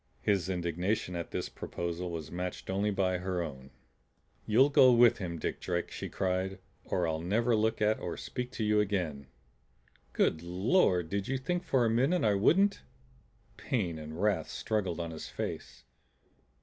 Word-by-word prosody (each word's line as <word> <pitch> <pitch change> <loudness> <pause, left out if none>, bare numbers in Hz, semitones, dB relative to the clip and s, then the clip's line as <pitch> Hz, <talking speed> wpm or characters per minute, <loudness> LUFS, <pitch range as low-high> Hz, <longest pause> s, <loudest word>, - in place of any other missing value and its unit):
His 95 -3 +1
indignation 90 +2 -1
at 85 -1 -4
this - - -3
proposal 85 +1 -4
was 80 -3 -6
matched 90 +1 -4
only 100 +2 +1
by 95 -2 0
her 90 -1 -2
own. 65 -4 -8 0.8
"You'll 130 +7 +5
go 130 -2 +7
with 120 -1 +5
him, 85 -4 -4
Dick - - -3
Drake," 85 -1 -2
she - - -5
cried, 95 0 -1 0.3
"or 90 -2 0
I'll 80 0 -2
never 115 +7 +2
look 110 0 +1
at 110 +1 +2
or - - -4
speak 125 -1 -5
to 110 - -3
you 105 0 +3
again!" 90 -10 -1 0.9
"Good 80 - +2
Lord! 90 - +2
Did 100 0 -2
you 135 - 0
think 175 +7 -2
for 130 -8 +2
a - - +2
minute 135 +10 +2
I 105 - +4
wouldn't?" 195 - +3 0.8
Pain 90 -10 -2
and 80 +2 -8
wrath 105 0 +1
struggled 95 -6 -2
on 85 -1 -3
his 80 - -7
face. - - -6
95 Hz, 165 wpm, -31 LUFS, 85-110 Hz, 0.9 s, go